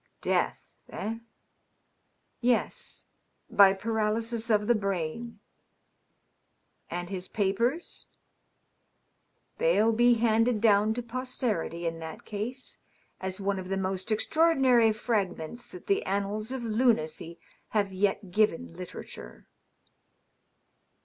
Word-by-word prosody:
^^ - - -45
Death, - - +2 0.3
eh?" 225 +2 -4 0.6
" - - -46
Yes 235 - -2 0.2
— - - -46
by 200 -1 +8
paralysis 225 +2 -1
of 210 -1 +3
the 240 - +4
brain." 200 +2 -3 0.7
" - - -45 0.7
And 175 +2 -4
his 185 -1 -4
papers 230 - -1 0.5
?" - - -46
" - - -46
They'll 230 - +4
be 240 +2 +5
handed 225 0 +2
down 215 0 +4
to 245 - -3
posterity, 235 -8 -2
in 165 0 -2
that 160 -1 -8
case, 230 +5 -5 0.4
as 190 +1 -3
one 200 0 -1
of 185 0 -7
the 195 - 0
most 190 +2 -1
extraordinary 260 -2 +4
fragments 215 -2 -2
that 180 - -11
the 200 - +1
annals 205 +3 -1
of 260 -2 -4
lunacy 215 -8 0 0.3
have 200 -3 0
yet 195 0 0
given 175 - +1
literature." - - -9
215 Hz, 120 wpm, -28 LUFS, 190-235 Hz, 0.7 s, by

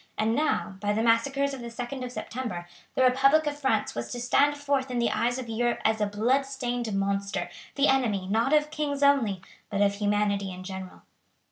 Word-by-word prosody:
And 220 +1 +1
now, 275 -8 0
by 205 +1 0
the 220 +2 0
massacres 270 +5 +2
of 270 - -6
the 235 - -6
2d 245 +3 -5
of 250 - -5
September, 225 -9 -5 0.3
the 260 - +3
republic 275 +5 +4
of 290 -1 -3
France 265 -7 0
was 120 0 -5
to 245 - -4
stand 285 +4 +3
forth 280 -2 0
in 250 - -2
the 235 -1 +2
eyes 235 +3 0
of 255 -2 -5
Europe 240 +1 0
as 220 0 +2
a 210 - +2
blood 225 +7 +2
stained 245 -4 -3
monster, 200 0 -1 0.2
the 280 +1 +3
enemy, 230 -8 +2
not 225 +6 +1
of 300 0 +3
kings 290 -2 -2
only, 230 -10 +3 0.3
but 200 -2 -1
of 200 -1 +4
humanity 205 -1 0
in 185 0 -8
general. 190 -1 -8
235 Hz, 205 wpm, -27 LUFS, 205-270 Hz, 0.3 s, republic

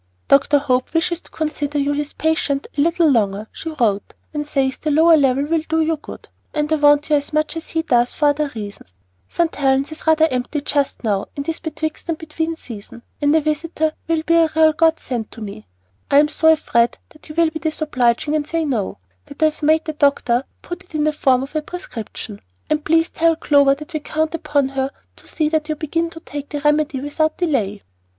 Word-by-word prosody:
"Dr. 280 +1 +5
Hope 255 +1 0
wishes 340 +1 +1
to - - -18
consider 300 -2 -3
you 285 0 +1
his 295 0 -3
patient 310 -3 0
a 285 - +1
little 335 +1 +3
longer," 210 -6 +1
she 325 - -6
wrote, 230 -10 -1 0.2
"and 295 -1 -3
says 270 -3 0
the 310 - -3
lower 320 +3 +6
level 275 -2 +3
will 325 +1 +1
do 320 0 +2
you 320 0 +2
good; 300 - -11 0.3
and 300 +1 0
I - - +3
want 290 +1 +4
you - - +6
as 285 - -5
much 305 +1 0
as 325 - -7
he 325 0 -1
does 245 -6 +2
for 295 -1 +3
other 290 0 0
reasons. 205 - -8 0.4
St. 335 -1 0
Helen's 270 +1 +1
is 315 - -11
rather 320 0 +5
empty 255 +4 -2
just 285 -2 -1
now, 205 -3 0
in 280 - -3
this 325 +2 -3
betwixt 315 +1 -5
and 325 - 0
between 320 +1 -3
season, 235 -4 -11 0.2
and 290 +1 +3
a 320 - +4
visitor 310 +1 -1
will 325 -1 0
be 335 - +2
a 330 -1 +5
real 315 -1 +5
God 325 +1 +3
send 235 -4 -4
to - - -11
me. 200 - -8 0.4
I 280 - +4
am 295 +1 +5
so 320 +1 +4
afraid 235 -7 +2
that 305 - -18
you 305 - -8
will 335 -1 +3
be 315 - -5
disobliging, 300 -4 0
and 300 -1 -1
say 325 0 -1
'No,' 235 -9 -2 0.3
that 285 +2 -4
I 310 -1 +4
have - - -20
made 315 +1 +3
the 315 - -3
doctor 280 -4 +2 0.2
put 350 - -7
it 345 - -14
in 300 - +1
the 305 0 +2
form 260 -3 +2
of 275 +3 -9
a 310 - +1
prescription; 235 - -8 0.3
and 305 0 +1
please 325 +1 +2
tell 330 0 +2
Clover 285 -3 +4
that 300 +4 -11
we 310 - -1
count 315 +2 -2
upon 295 -4 0
her 270 0 -1 0.3
to - - -12
see 310 - 0
that 310 -1 -1
you 310 - 0
begin 330 +2 -1
to 330 - -10
take 290 -2 -7
the 295 - -3
remedy 295 -1 +2
without 310 +3 -1
delay." 225 - -1
300 Hz, 220 wpm, -20 LUFS, 275-320 Hz, 0.4 s, lower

